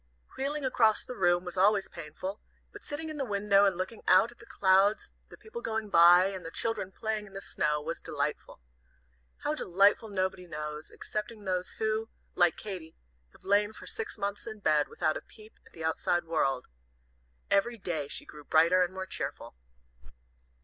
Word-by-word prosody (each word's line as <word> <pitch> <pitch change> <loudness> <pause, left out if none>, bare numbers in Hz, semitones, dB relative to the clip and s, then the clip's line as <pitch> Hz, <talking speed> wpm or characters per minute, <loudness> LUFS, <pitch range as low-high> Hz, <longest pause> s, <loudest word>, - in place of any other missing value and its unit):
Wheeling 280 +1 -2
across 225 -4 +3
the 250 - -7
room 175 -2 +2
was 180 +1 -6
always 200 +1 +4
painful, 170 +5 -7 0.3
but - - -11
sitting 300 +2 -5
in 310 - -6
the 280 - -1
window 200 -3 +3
and 195 -3 +2
looking 190 +5 -4
out 235 - +6
at 240 - -20
the 235 - -15
clouds, 195 +2 +3 0.2
the - - -13
people 470 +2 -8
going 220 - -3
by, 175 +2 +8
and 190 -2 -4
the 165 - -6
children 195 0 -2
playing 215 0 -3
in 195 - -16
the 195 - -5
snow, 150 -5 0
was 160 +3 -4
delightful. - - -3 0.8
How 295 - 0
delightful 200 - +3
nobody 185 -2 -2
knows, 150 -1 -6
excepting 210 0 -5
those 185 -1 -1
who, 220 0 -1 0.2
like 175 -2 +3
Katy, 185 -6 -7 0.4
have - - -21
lain 205 +2 +2
for - - -11
six 450 - -4
months 200 +2 -3
in 220 -1 -6
bed, 155 -7 +2
without 155 - -1
a - - -8
peep 215 0 -16
at - - -22
the 165 - -8
outside 160 +2 +1
world. 135 -6 0 0.9
Every 235 +4 +2
day 165 -8 -3
she - - -5
grew 150 -1 -12
brighter 165 +5 +4
and 180 +1 -4
more 190 0 -4
cheerful. 190 - -5
195 Hz, 180 wpm, -30 LUFS, 175-220 Hz, 0.9 s, by